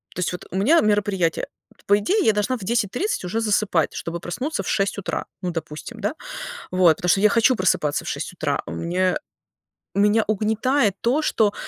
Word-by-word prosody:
То -, -, -5 dB
есть 180 Hz, -, 0 dB
вот 180 Hz, -, -7 dB
у -, -, -6 dB
меня 300 Hz, +12 st, +5 dB
мероприятие. 205 Hz, -5 st, +1 dB, 0.2 s
Вот, 190 Hz, -5 st, -25 dB
по 205 Hz, -, +5 dB
идее, 400 Hz, -, +1 dB
я 220 Hz, -, +5 dB
должна 210 Hz, +5 st, 0 dB
в -, -, -13 dB
10:30 235 Hz, -, -1 dB
уже 190 Hz, +6 st, -2 dB
засыпать, 205 Hz, -6 st, +1 dB
чтобы 170 Hz, +1 st, -4 dB
проснуться 195 Hz, -, -3 dB
в -, -, -8 dB
6 195 Hz, +1 st, 0 dB
утра. 200 Hz, -, -3 dB, 0.2 s
Ну, 180 Hz, -1 st, -2 dB
допустим, 155 Hz, -2 st, -7 dB
да. -, -, -1 dB, 0.6 s
Вот. 180 Hz, -3 st, +5 dB
Потому 180 Hz, -3 st, -2 dB
что 195 Hz, -, +4 dB
я 210 Hz, -, +6 dB
хочу 230 Hz, +4 st, +4 dB
просыпаться 160 Hz, -6 st, +1 dB
в -, -, -8 dB
6 -, -, -4 dB
утра. -, -, -1 dB
У 80 Hz, -, -7 dB
меня 180 Hz, -, 0 dB, 0.8 s
меня 210 Hz, +2 st, +4 dB
угнетает 220 Hz, +1 st, +1 dB
то, 260 Hz, +7 st, +2 dB
что, 210 Hz, -7 st, +2 dB
205 Hz, 195 wpm, -23 LUFS, 180-225 Hz, 0.8 s, я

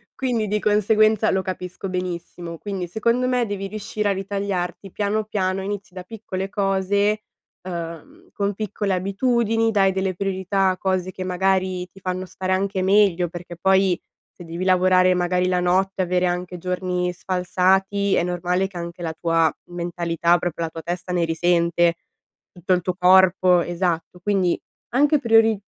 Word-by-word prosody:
Quindi 240 Hz, -5 st, -1 dB
di 210 Hz, +1 st, 0 dB
conseguenza 215 Hz, +1 st, +3 dB
lo 190 Hz, 0 st, +1 dB
capisco 185 Hz, +1 st, -5 dB
benissimo, 175 Hz, -2 st, -5 dB
quindi, 190 Hz, -1 st, -4 dB
secondo 235 Hz, +6 st, 0 dB
me, 250 Hz, -1 st, +1 dB
devi 200 Hz, -2 st, -4 dB
riuscire 210 Hz, 0 st, -3 dB
a -, -, +2 dB
ritagliarti 195 Hz, -1 st, -3 dB
piano 210 Hz, +2 st, -1 dB
piano, 195 Hz, -3 st, -1 dB
inizi 195 Hz, -2 st, -5 dB
da 185 Hz, -, -7 dB
piccole 195 Hz, -2 st, -5 dB
cose, 200 Hz, +1 st, +1 dB, 0.4 s
ehm, 180 Hz, -, -8 dB
con 200 Hz, -1 st, -1 dB
piccole 205 Hz, -1 st, -2 dB
abitudini, 225 Hz, +4 st, +1 dB
dai 195 Hz, -3 st, +3 dB
delle 190 Hz, -1 st, -1 dB
priorità 195 Hz, 0 st, 0 dB
a 185 Hz, -, -1 dB
cose 185 Hz, -1 st, -1 dB
che 185 Hz, -, -6 dB
magari 185 Hz, 0 st, 0 dB
ti 195 Hz, -, -16 dB
fanno 185 Hz, 0 st, -3 dB
stare 185 Hz, 0 st, -4 dB
anche 190 Hz, 0 st, 0 dB
meglio 190 Hz, -2 st, +3 dB
perché, 175 Hz, 0 st, -9 dB
poi, 190 Hz, 0 st, +3 dB, 0.3 s
se 175 Hz, -, -13 dB
devi 170 Hz, +2 st, -5 dB
lavorare 185 Hz, 0 st, +4 dB
magari 180 Hz, 0 st, +1 dB
la 180 Hz, -1 st, +1 dB
notte 190 Hz, +2 st, +1 dB
e -, -, +1 dB
avere 180 Hz, +1 st, +1 dB
anche 180 Hz, 0 st, -2 dB
giorni 180 Hz, 0 st, -2 dB
sfalsati, 190 Hz, +2 st, +1 dB
è -, -, +2 dB
normale 180 Hz, +1 st, 0 dB
che 190 Hz, -2 st, -11 dB
anche 170 Hz, +1 st, -6 dB
la 160 Hz, -1 st, -3 dB
tua 165 Hz, -1 st, +1 dB
mentalità, 170 Hz, -1 st, 0 dB
proprio 170 Hz, -1 st, -3 dB
la 165 Hz, -, -2 dB
tua 165 Hz, 0 st, -8 dB
testa 175 Hz, +2 st, -4 dB
ne 175 Hz, -1 st, +2 dB
risente, 170 Hz, +1 st, +2 dB, 0.6 s
tutto 185 Hz, +1 st, -1 dB
il 180 Hz, -, +2 dB
tuo 180 Hz, +1 st, -2 dB
corpo 185 Hz, -1 st, +5 dB
esatto. 175 Hz, 0 st, -2 dB
Quindi 185 Hz, -2 st, +1 dB, 0.3 s
anche 290 Hz, +4 st, +3 dB
priori 225 Hz, -4 st, +4 dB
185 Hz, 160 wpm, -22 LUFS, 180-200 Hz, 0.6 s, corpo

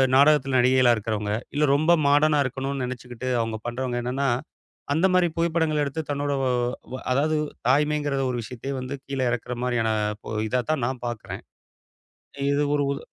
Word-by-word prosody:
நாடகத்துல 135 Hz, -2 st, +5 dB
நடிகைகளா 125 Hz, 0 st, +5 dB
இருக்குறவங்க. 105 Hz, -1 st, -2 dB, 0.2 s
இல்ல 150 Hz, +1 st, +1 dB
ரொம்ப 155 Hz, +4 st, +3 dB, 0.2 s
மாடர்னா 145 Hz, +1 st, +4 dB
இருக்கணும்னு 135 Hz, +1 st, -3 dB
நெனச்சுக்கிட்டு 125 Hz, 0 st, -6 dB
அவுங்க 115 Hz, -1 st, -2 dB
பண்றவங்க 120 Hz, 0 st, -2 dB
என்னன்னா, 135 Hz, +3 st, -1 dB, 0.7 s
அந்த 165 Hz, +5 st, +2 dB
மாரி 180 Hz, -1 st, +4 dB
புகைப்படங்களை 160 Hz, -2 st, +1 dB
எடுத்துத் 150 Hz, +2 st, -5 dB
தன்னோட, 145 Hz, 0 st, -1 dB, 0.6 s
ஓ -, -, -3 dB, 0.2 s
அதாவது 155 Hz, +4 st, +2 dB, 0.3 s
தாய்மைங்கிற 145 Hz, 0 st, +2 dB, 0.2 s
ஒரு 125 Hz, -, -2 dB
விஷயத்தையே 125 Hz, +4 st, -6 dB
வந்து 130 Hz, +2 st, -5 dB
கீழ 135 Hz, -1 st, -4 dB
இரக்கற 125 Hz, 0 st, -3 dB
மாரியான 120 Hz, -3 st, +1 dB, 0.4 s
ஓ -, -, -5 dB, 0.2 s
இதாத்தான் 125 Hz, +2 st, 0 dB
நான் 130 Hz, -2 st, -5 dB
பாக்கிறேன். 120 Hz, -2 st, -6 dB, 1.1 s
இது 145 Hz, +1 st, +2 dB
ஒரு 145 Hz, -, +2 dB
உது 140 Hz, -, -5 dB
135 Hz, 145 wpm, -25 LUFS, 125-150 Hz, 1.1 s, நாடகத்துல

